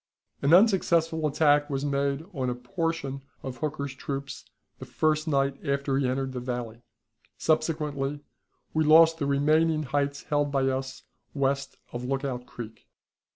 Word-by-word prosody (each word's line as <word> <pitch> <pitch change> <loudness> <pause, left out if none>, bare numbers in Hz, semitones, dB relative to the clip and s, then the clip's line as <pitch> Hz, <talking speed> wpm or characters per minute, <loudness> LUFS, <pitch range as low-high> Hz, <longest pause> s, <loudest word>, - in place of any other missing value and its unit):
An 140 - +2
unsuccessful 170 -5 +4
attack 145 0 +3
was 140 0 -2
made 140 +1 0
on 130 -4 -1
a 125 - -2
portion 140 +1 -3 0.2
of 130 -1 -5
Hooker's 140 0 -3
troops 140 +1 -6 0.3
the - - -7
first 155 0 0
night 140 -2 0
after 140 0 0
he 135 - +1
entered 130 +1 -1
the 130 - -4
valley. 120 -2 -5 0.6
Subsequently, 150 -3 0 0.5
we 155 - +2
lost 165 +1 +6
the 140 - 0
remaining 155 +3 +2
heights 140 +1 -1
held 145 -1 0
by 135 -1 +2
us 130 0 -4 0.3
west 140 0 -1 0.2
of 120 0 -4
Lookout 130 -1 -3
Creek. 115 -2 -10
140 Hz, 145 wpm, -27 LUFS, 135-155 Hz, 0.6 s, lost